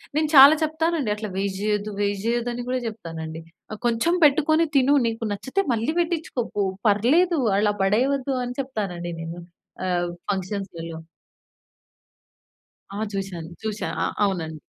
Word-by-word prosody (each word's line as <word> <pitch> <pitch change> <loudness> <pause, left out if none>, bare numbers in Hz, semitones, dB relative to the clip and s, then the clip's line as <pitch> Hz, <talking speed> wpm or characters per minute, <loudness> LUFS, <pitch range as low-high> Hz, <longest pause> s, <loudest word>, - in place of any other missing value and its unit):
నేను 305 0 +1
చాలా 275 +2 +11
చెప్తానండి. 315 -4 0
అట్లా 215 0 -5
వేస్ట్ 195 0 -2
జెయ్యొద్దు, 210 0 -1
వేస్ట్ 200 -1 -1
జెయ్యదు 240 +1 0
అని 245 0 -4
కూడా 255 0 0
చెప్తానండి. 165 -6 -6 0.3
ఆహ్, 215 - -6
"కొంచెం 235 +8 +2
పెట్టుకొని 310 +3 +4
తిను, 275 +1 +5
నీకు 230 0 -3
నచ్చితే 265 - -1
మళ్ళీ 230 +5 0
పెట్టించుకో 325 -7 -1
పో 205 - +2 0.2
పర్లేదు, 300 - +3 0.2
అలా 205 0 +2
పడేయవద్దు" 260 +7 +1
అని 245 0 -5
చెప్తానండి 190 -9 -4
నేను 165 +1 -6 0.5
ఆహ్, 175 -1 0 0.2
ఫంక్షన్స్‌లలో. 185 -4 -5 2.0
ఆ! - - -4
చూసాను 185 -4 -5
చూసా. 215 -1 -3
ఆ! - - +2 0.2
అవునండి. 160 -5 -2
215 Hz, 135 wpm, -24 LUFS, 190-275 Hz, 2.0 s, చాలా